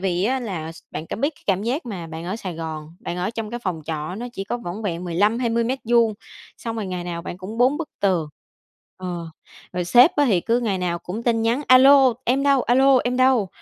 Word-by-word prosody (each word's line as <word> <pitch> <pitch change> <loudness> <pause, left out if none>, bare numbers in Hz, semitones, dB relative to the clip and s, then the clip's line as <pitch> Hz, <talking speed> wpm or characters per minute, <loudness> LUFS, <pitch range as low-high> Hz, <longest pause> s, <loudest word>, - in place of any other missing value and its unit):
vì 185 0 0
á 260 +3 +1
là 165 -8 -5
s - - -15
bạn 160 - -6
có - - -5
biết 285 +6 -1
cái - - -24
cảm 195 0 +1
giác 250 +6 -2
mà 180 -7 -5
bạn 160 +1 -7
ở 190 +5 -3
Sài 185 -6 -6
Gòn, 160 -1 -6
bạn 180 -7 -5
ở 180 +4 -1
trong 225 -2 -5
cái 240 - -4
phòng 175 -5 -2
trọ 155 +2 -4
nó 235 +4 -5
chỉ 195 -5 -5
có 240 - -2
vỏn 200 0 -6
vẹn 180 -3 -3
15-20 230 +6 +1
mét 260 +3 -1
vuông, 230 -2 +3 0.4
xong 230 -1 -5
rồi 215 -3 -3
ngày 180 -1 -4
nào 170 -1 -5
bạn 175 - -6
cũng 205 +5 -7
bốn 255 +4 +4
bức 320 -1 -4
tường. 180 -6 +1 0.7
Ờ, 175 -3 -5 0.4
rồi 180 -1 -2
sếp 245 - +6
á 290 - +4
thì 190 -8 +3
cứ 235 +5 +1
ngày 200 -5 -1
nào 175 -1 -1
cũng 185 +7 -6
tin 230 -2 +1
nhắn: 235 +6 +1
"A 255 0 +8
lô, 270 -1 +7
em 265 +3 +1
đâu? 275 -3 +3
A 245 - +2
lô, 270 0 +5
em 250 0 0
đâu? 255 -6 +3
215 Hz, 250 wpm, -22 LUFS, 175-245 Hz, 0.7 s, A